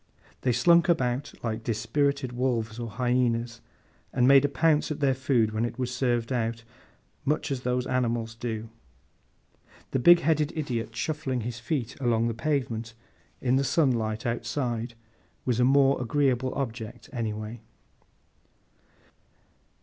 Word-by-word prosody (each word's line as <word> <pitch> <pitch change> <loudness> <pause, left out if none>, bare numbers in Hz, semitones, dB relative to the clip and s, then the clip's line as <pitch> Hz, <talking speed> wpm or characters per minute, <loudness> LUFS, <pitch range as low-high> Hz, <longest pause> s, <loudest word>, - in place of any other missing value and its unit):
They 125 - +2
slunk 170 +9 +4
about, 130 -4 +1
like 115 -1 -3
dispirited 140 +3 0
wolves 120 -3 -1
or 120 -1 -4
hyænas; 120 0 0 0.5
and 125 0 +3
made 135 0 +7
a 145 - +2
pounce 155 +1 +2
at 150 - -4
their 140 -2 +3
food 130 -4 +1
when 110 +1 -1
it 120 0 -3
was 125 -1 -2
served 120 -1 0
out, 115 -1 -2 0.6
much 150 +1 -1
as 130 -2 -2
those 125 0 -1
animals 120 -3 -1
do. 115 -1 -5 1.2
The 135 - +1
big 175 +6 +7
headed 155 0 +1
idiot 115 -7 -3
shuffling 145 -5 -2
his 115 +1 -5
feet 125 -1 -3
along 115 -2 +2
the - - -2
pavement, 120 -4 -2 0.5
in 130 0 +2
the 135 - +2
sunlight 120 -6 +1
outside, 120 0 -2 0.5
was 125 -2 +1
a - - +4
more 135 +1 +4
agreeable 130 0 +1
object 120 -3 -5
everyway. 110 -1 -4
125 Hz, 135 wpm, -27 LUFS, 115-135 Hz, 1.2 s, made